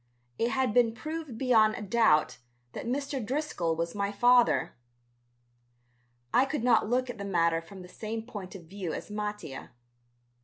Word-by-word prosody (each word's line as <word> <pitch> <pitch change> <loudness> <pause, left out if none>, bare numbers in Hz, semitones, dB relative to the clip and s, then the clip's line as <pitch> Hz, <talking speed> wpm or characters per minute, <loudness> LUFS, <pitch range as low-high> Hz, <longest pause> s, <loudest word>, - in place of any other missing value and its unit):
It 230 - +2
had 260 -3 0
been 230 -1 +3
proved 310 -4 -6
beyond 225 -4 +4
a - - -6
doubt 185 - +3 0.3
that - - -6
Mr. 275 0 -2
Driscoll 225 - -1
was 165 +1 -2
my 200 0 -1
father. 240 -5 +3 1.6
I 255 - +6
could 270 -3 -2
not 230 -3 +3
look 250 +1 +1
at 230 - -13
the - - -4
matter 170 -4 +1
from 185 +3 -12
the - - -11
same 220 +4 -5
point 205 -5 -8
of 185 - -9
view 180 0 -5
as - - -7
Mattia. 210 -9 -5
215 Hz, 160 wpm, -29 LUFS, 185-245 Hz, 1.6 s, I